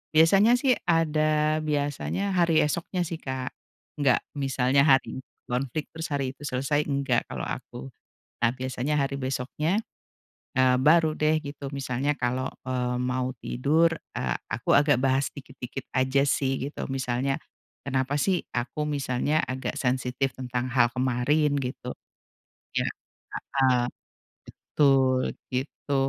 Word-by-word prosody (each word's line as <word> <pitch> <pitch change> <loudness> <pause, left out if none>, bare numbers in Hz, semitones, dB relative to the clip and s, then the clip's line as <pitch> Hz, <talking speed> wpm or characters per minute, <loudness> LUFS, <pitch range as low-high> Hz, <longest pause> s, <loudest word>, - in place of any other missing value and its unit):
Biasanya, 195 +9 +6
sih, 260 -1 +4 0.2
ada, 155 -1 +2
biasanya 150 +6 -1
hari 170 -2 +4
esoknya 170 +4 -2
sih, 165 0 -4
Kak, 130 -1 -4 0.5
enggak 135 -4 +3 0.2
misalnya 135 0 +2
hari 135 -2 +3
itu - - -48 0.2
konflik 130 +4 -2
terus 160 0 -4
hari 135 -2 -1
itu 145 - -15
selesai, 140 +3 0
enggak 140 -1 +1
kalau - - -4
aku. 65 - -6 0.5
Nah, 115 - +5
biasanya 130 +2 -2
hari 140 0 -2
besoknya, 135 - -1 0.8
eee, 130 -1 +5
baru 160 +1 +5
deh, 155 0 +2
gitu. 140 -1 -6
Misalnya 135 +1 -1
kalau, 125 +1 -1 0.2
eee, 125 -1 -1
mau 125 0 -1
tidur, 160 +6 +2 0.2
eee, 60 -1 -1
aku - - -3
agak 145 -2 +5
bahas 135 +1 +2
dikit-dikit 135 -1 -8
aja, 130 +1 +3
sih, 135 -1 +1
gitu. - - -6
Misalnya, 130 +1 0 0.5
kenapa 135 0 0
sih, 185 +2 +1
aku 120 +5 -2
misalnya 140 +1 0
agak 130 -1 -4
sensitif 130 +1 0
tentang 125 -1 -2
hal 120 -1 +5
kemarin, 130 +4 +2
gitu 125 0 -5 0.8
iya, - - +1 0.8
heeh, 130 -1 +5 1.0
betul, 135 -3 +4 0.3
gitu. 135 +2 -3
135 Hz, 130 wpm, -26 LUFS, 130-150 Hz, 1.0 s, Biasanya